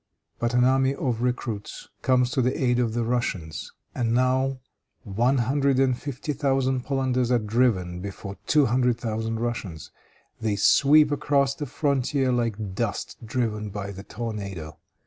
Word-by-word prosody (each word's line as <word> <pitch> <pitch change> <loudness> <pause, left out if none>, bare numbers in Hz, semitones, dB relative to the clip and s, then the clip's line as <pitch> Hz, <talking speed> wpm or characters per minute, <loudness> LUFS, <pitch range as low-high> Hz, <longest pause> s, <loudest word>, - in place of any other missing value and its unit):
But 120 +1 0
an 125 - +4
army 135 +1 +3
of 120 -4 -2
recruits 120 -4 -3
comes 125 -1 +2
to 130 - +1
the 125 +1 0
aid 125 -2 +2
of 115 -2 0
the 120 - +1
Russians. 110 -10 -2 0.2
And 115 -2 0
now 130 +1 +2 0.5
one 120 +6 +1
hundred 135 +2 +2
and 130 -2 +3
fifty 140 +3 -4
thousand 135 -3 0
Polanders 130 -3 0
are 125 - +4
driven 105 -6 +1
before 100 0 -7
two 150 -2 +4
hundred 125 0 +2
thousand 115 -1 -3
Russians. 105 -10 -4 0.5
They 110 -2 0
sweep 145 +8 +5
across 140 -1 +2
the 145 +1 -5
frontier 135 -1 0
like 110 -5 -1
dust 115 +2 -3
driven 110 -3 -2
by 100 0 -5
the 95 0 -8
tornado. 100 -8 -6
120 Hz, 150 wpm, -25 LUFS, 110-130 Hz, 0.5 s, sweep